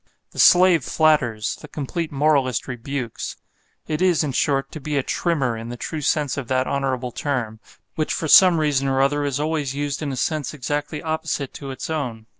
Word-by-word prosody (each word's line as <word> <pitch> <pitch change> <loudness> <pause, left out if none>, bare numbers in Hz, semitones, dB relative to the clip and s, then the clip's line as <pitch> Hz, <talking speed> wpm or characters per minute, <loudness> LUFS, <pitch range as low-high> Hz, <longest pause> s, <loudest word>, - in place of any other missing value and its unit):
The - - -9
slave 180 -4 +6
flatters; 130 -10 +1
the - - -11
complete 155 +3 -4
moralist 140 -4 +1
rebukes. 125 -1 -5 0.5
It 155 +2 -2
is, 180 -4 +3
in 145 - -1
short, 135 +1 0
to 155 - -7
be 150 0 -3
a 135 - +1
Trimmer 140 -9 0
in 115 +1 -7
the 120 - -6
true 155 +5 -5
sense 145 -1 0
of 135 -4 -4
that 130 0 +1
honorable 130 -3 -2
term; 120 -6 -3 0.3
which 155 - -2
for 160 - -2
some 180 +2 +7
reason 145 -3 +1
or 135 0 +1
other 145 +2 +2
is 140 -1 -1
always 150 -3 -1
used 145 0 -3
in 145 -2 -2
a - - -3
sense 155 +1 -2
exactly 145 +2 -3
opposite 155 -3 -3
to 140 - -8
its 130 -1 -5
own. 125 -9 -4
140 Hz, 195 wpm, -22 LUFS, 130-155 Hz, 0.5 s, some